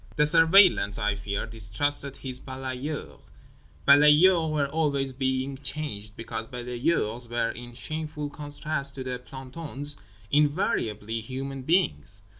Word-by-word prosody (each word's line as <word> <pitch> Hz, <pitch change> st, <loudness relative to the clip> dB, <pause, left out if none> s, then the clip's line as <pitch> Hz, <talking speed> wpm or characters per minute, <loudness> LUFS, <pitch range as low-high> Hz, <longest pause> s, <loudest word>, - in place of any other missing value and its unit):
The 150 Hz, -, +4 dB
Surveillant, 165 Hz, -, +5 dB
I 105 Hz, 0 st, +1 dB
fear, 100 Hz, 0 st, -3 dB
distrusted 115 Hz, +6 st, -1 dB
his 130 Hz, -2 st, -6 dB
balayeur. 130 Hz, +3 st, -5 dB, 0.7 s
Balayeurs 155 Hz, +4 st, +6 dB
were 150 Hz, -2 st, +1 dB
always 140 Hz, -2 st, 0 dB
being 130 Hz, +1 st, -1 dB
changed 110 Hz, -9 st, -3 dB
because 115 Hz, 0 st, -5 dB
balayeurs 120 Hz, -1 st, -1 dB
were 120 Hz, -1 st, 0 dB
(in 120 Hz, 0 st, -10 dB
shameful 150 Hz, +3 st, -4 dB
contrast 145 Hz, -1 st, -4 dB
to 130 Hz, -, -5 dB
the 125 Hz, -1 st, -4 dB
plantons) 140 Hz, +2 st, -5 dB, 0.3 s
invariably 115 Hz, -7 st, +1 dB
human 135 Hz, +3 st, -5 dB
beings. 100 Hz, -, 0 dB
135 Hz, 115 wpm, -27 LUFS, 120-150 Hz, 0.7 s, Balayeurs